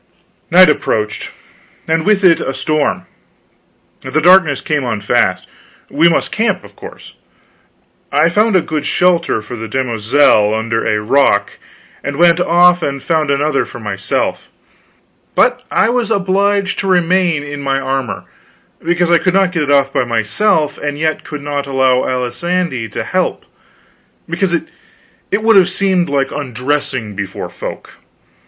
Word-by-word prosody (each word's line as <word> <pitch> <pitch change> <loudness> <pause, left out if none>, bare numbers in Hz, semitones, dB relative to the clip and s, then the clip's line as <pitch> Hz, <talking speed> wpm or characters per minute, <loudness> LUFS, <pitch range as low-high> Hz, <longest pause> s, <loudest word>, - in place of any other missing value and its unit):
Night 185 +2 +7
approached, 110 -7 -1 0.6
and 160 +2 0
with 210 -2 +2
it 170 -3 +5
a 135 - -3
storm. 155 -2 -1 1.0
The 155 - -2
darkness 170 -4 +4
came 150 -3 -2
on 115 -4 -2
fast. 100 - 0 0.4
We 165 +4 +4
must 165 - -1
camp, 225 +2 -1
of - - -16
course. - - -12 1.0
I - - +3
found 210 +4 +2
a 180 - +3
good 155 -2 -3
shelter 170 -9 +1
for 115 +3 -8
the 115 -1 -6
demoiselle 115 -2 +2
under 115 +1 -2
a 105 - +1
rock, 140 +6 +1 0.4
and 140 - -4
went 170 +2 +4
off 175 0 +4
and 140 -3 -2
found 155 -3 0
another 140 0 +1
for 120 - -10
myself. 100 -3 -3 0.9
But - - +2
I - - +2
was 240 -1 -1
obliged 200 0 0
to 195 - -2
remain 175 -3 +2
in 145 0 -7
my 135 -1 -1
armor, 135 -1 -3 0.6
because 175 +1 +1
I 170 - +5
could 185 0 0
not 195 -2 +3
get 165 -3 -2
it 145 - -2
off 140 -1 +2
by - - +1
myself 145 - 0
and 145 -1 -4
yet 155 +1 -1
could 150 -2 -8
not 145 -1 -3
allow 130 -2 +2
Alisande 130 - -2
to - - -3
help, - - -2 0.8
because 170 +2 -1
it 200 +4 -6
would 225 -2 +5
have 190 -1 +5
seemed 190 -2 0
so 140 - -6
like 135 -1 0
undressing 130 -4 -3
before 100 -1 -5
folk. - - -8
150 Hz, 150 wpm, -15 LUFS, 130-180 Hz, 1.0 s, Night